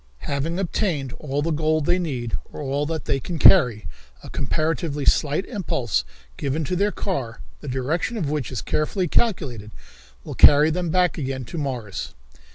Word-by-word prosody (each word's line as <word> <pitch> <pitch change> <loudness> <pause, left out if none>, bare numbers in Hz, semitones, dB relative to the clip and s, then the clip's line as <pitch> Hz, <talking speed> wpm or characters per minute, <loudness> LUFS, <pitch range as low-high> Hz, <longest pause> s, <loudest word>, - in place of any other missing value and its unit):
"Having 145 +5 -2
obtained 165 - -1
all 145 -1 -2
the 165 - 0
gold 155 0 +1
they 180 +4 +2
need, 125 -9 -3 0.2
or - - -9
all 145 0 -1
that 160 -3 -3
they 135 - 0
can 170 +5 -5
carry, 125 - +6 0.4
a - - -9
comparatively 155 -2 -1
slight 150 +6 +2
impulse 130 - -1 0.3
given 145 +3 -1
to 180 +5 -2
their 200 +3 +2
car, 130 - -4 0.2
the 150 - -10
direction 145 - -1
of 170 -9 -1
which 145 -5 -2
is 125 - -4
carefully 175 +5 0
calculated, 135 - 0 0.5
will - - -7
carry 150 +2 +7
them 175 +1 -1
back 180 -1 +2
again 130 -2 -3
to 170 - -7
Mars." 120 -9 -4
150 Hz, 165 wpm, -23 LUFS, 135-170 Hz, 0.5 s, carry